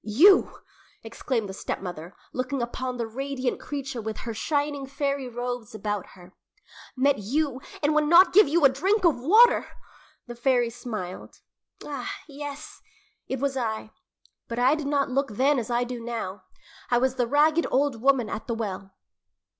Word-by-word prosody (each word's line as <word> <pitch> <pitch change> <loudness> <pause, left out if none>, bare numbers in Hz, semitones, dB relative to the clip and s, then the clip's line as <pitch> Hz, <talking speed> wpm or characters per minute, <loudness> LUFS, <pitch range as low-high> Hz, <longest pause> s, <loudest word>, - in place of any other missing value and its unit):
"You!" 325 - +5 0.5
exclaimed 225 0 -3
the 190 - -7
stepmother, 175 -3 -6 0.2
looking 255 +2 -2
upon 250 +1 -3
the 235 - -2
radiant 265 +2 -3
creature 275 -5 -5
with 220 0 -5
her 230 - -5
shining 285 +3 -1
fairy 275 -1 -2
robes 245 -2 -5
about 210 -2 -3
her. 180 +1 -15 0.6
"Met 275 0 +3
you, 265 +5 -1 0.2
and 295 +1 +3
would 305 0 +3
not 345 +4 +7
give 410 -2 +7
you 310 +1 +3
a - - +9
drink 375 +11 +1
of 305 -8 +3
water!" 440 - +5 0.6
The 240 - -8
fairy 240 -1 +1
smiled. 220 -6 -7 0.4
"Ah, 280 -4 -5 0.2
yes; 290 0 -8 0.5
it 265 - -3
was 275 0 -1
I, 220 -3 -3 0.6
but 235 - -5
I 250 +3 +4
did 305 -2 -3
not 280 -2 0
look 275 +2 +1
then 270 +5 +2
as 230 - -5
I 240 0 +1
now 235 -5 -4
do. - - -40 0.3
I 240 - +3
was 260 +1 +2
the 250 -2 0
ragged 305 +5 +3
old 270 -4 +1
woman 265 -3 +3
at 215 - -6
the 235 - -1
well." 195 -3 -5
255 Hz, 165 wpm, -26 LUFS, 230-285 Hz, 0.6 s, a